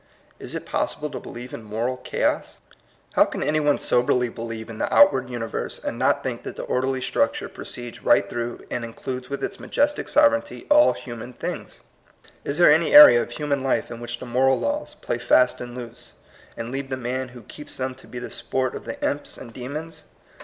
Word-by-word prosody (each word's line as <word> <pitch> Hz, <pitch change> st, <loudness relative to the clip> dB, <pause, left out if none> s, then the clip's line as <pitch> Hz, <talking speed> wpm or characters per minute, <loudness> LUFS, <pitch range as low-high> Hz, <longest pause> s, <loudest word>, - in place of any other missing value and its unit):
Is -, -, -7 dB
it -, -, -5 dB
possible 150 Hz, -1 st, -2 dB
to -, -, -5 dB
believe 125 Hz, +1 st, -9 dB
in -, -, -6 dB
moral 115 Hz, +4 st, -2 dB
chaos? 125 Hz, -, -1 dB, 0.6 s
How -, -, +6 dB
can -, -, -4 dB
any 150 Hz, +2 st, +1 dB
one 145 Hz, -1 st, +3 dB
soberly 125 Hz, 0 st, +2 dB
believe 115 Hz, -1 st, -6 dB
in 115 Hz, -2 st, -9 dB
the -, -, -1 dB
outward 135 Hz, -10 st, +5 dB
universe, 120 Hz, -2 st, -4 dB
and -, -, -5 dB
not -, -, +2 dB
think -, -, -3 dB
that -, -, -7 dB
the -, -, -5 dB
orderly 130 Hz, +1 st, -1 dB
structure -, -, 0 dB
proceeds 120 Hz, -1 st, -8 dB
right 100 Hz, 0 st, +4 dB
through 120 Hz, +2 st, -5 dB
and 120 Hz, -, -2 dB
includes 125 Hz, +2 st, -6 dB
with 140 Hz, -, -4 dB
its 195 Hz, -, -4 dB
majestic 295 Hz, +1 st, 0 dB
sovereignty 290 Hz, 0 st, +2 dB
all 300 Hz, 0 st, +7 dB
human 120 Hz, -1 st, -8 dB
things? -, -, -6 dB, 0.6 s
Is 140 Hz, -, -2 dB
there 175 Hz, -4 st, +7 dB
any 165 Hz, -, +2 dB
area 295 Hz, -, +11 dB
of -, -, -5 dB
hu 150 Hz, +5 st, -5 dB
man 140 Hz, -2 st, 0 dB
life 135 Hz, -2 st, 0 dB
in 115 Hz, -, -7 dB
which 120 Hz, 0 st, -5 dB
the 130 Hz, -, -8 dB
moral 130 Hz, +2 st, +2 dB
laws 290 Hz, +1 st, -2 dB
play 120 Hz, -, -3 dB
fast 125 Hz, +1 st, +3 dB
and 120 Hz, 0 st, -7 dB
loose, 120 Hz, -2 st, -9 dB, 0.4 s
and 115 Hz, +1 st, -5 dB
leave 135 Hz, 0 st, -4 dB
the 130 Hz, -, -2 dB
man 130 Hz, +1 st, -3 dB
who 120 Hz, -1 st, -13 dB
keeps 150 Hz, -, -9 dB
them 130 Hz, 0 st, -2 dB
to 130 Hz, -, -16 dB
be 125 Hz, -, -9 dB
the 120 Hz, -, -6 dB
sport 130 Hz, -1 st, -2 dB
of -, -, -7 dB
the 115 Hz, -, -6 dB
imps 145 Hz, -, -3 dB
and 115 Hz, -, -10 dB
de 125 Hz, +1 st, -7 dB
mons? 155 Hz, +2 st, -7 dB
130 Hz, 210 wpm, -24 LUFS, 120-145 Hz, 0.6 s, area